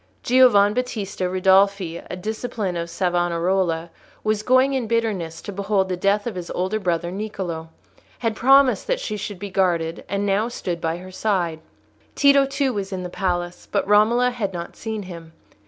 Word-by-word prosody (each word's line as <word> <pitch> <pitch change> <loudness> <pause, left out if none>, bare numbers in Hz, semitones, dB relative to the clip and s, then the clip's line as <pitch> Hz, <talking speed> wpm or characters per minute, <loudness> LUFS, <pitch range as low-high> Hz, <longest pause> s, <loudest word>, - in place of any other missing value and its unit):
Giovan 235 -5 +5
Battista 215 -7 -2
Ridolfi, 190 -1 +3
a - - -4
disciple 215 -1 -3
of 170 0 -3
Savonarola, 175 -1 0 0.3
who 215 - -1
was 215 -1 +1
going 255 +4 +3
in 255 -4 -1
bitterness 210 -8 -1
to - - -6
behold 200 -1 0
the 185 - 0
death 200 +3 +1
of 235 - -3
his 180 -2 -6
elder 190 +4 -1
brother 175 -3 -1
Niccolò, 190 -5 -5 0.5
had 225 -2 -1
promised 265 -2 +4
that - - 0
she 215 - -4
should 205 -1 -5
be 200 +1 -7
guarded, 170 -4 0
and 200 +1 -1
now 205 +3 +1
stood 175 -8 -4
by 165 +1 -1
her 185 +1 -10
side. 180 -5 -1 0.6
Tito, 280 -1 +5
too, 275 -1 0
was 200 -2 -4
in 185 -1 -4
the 180 - -5
palace; 175 -1 -3
but - - 0
Romola 230 +4 +4
had 210 -6 -3
not 170 -1 -6
seen 220 -2 -5
him. 170 -3 -10
195 Hz, 175 wpm, -22 LUFS, 175-220 Hz, 0.6 s, Giovan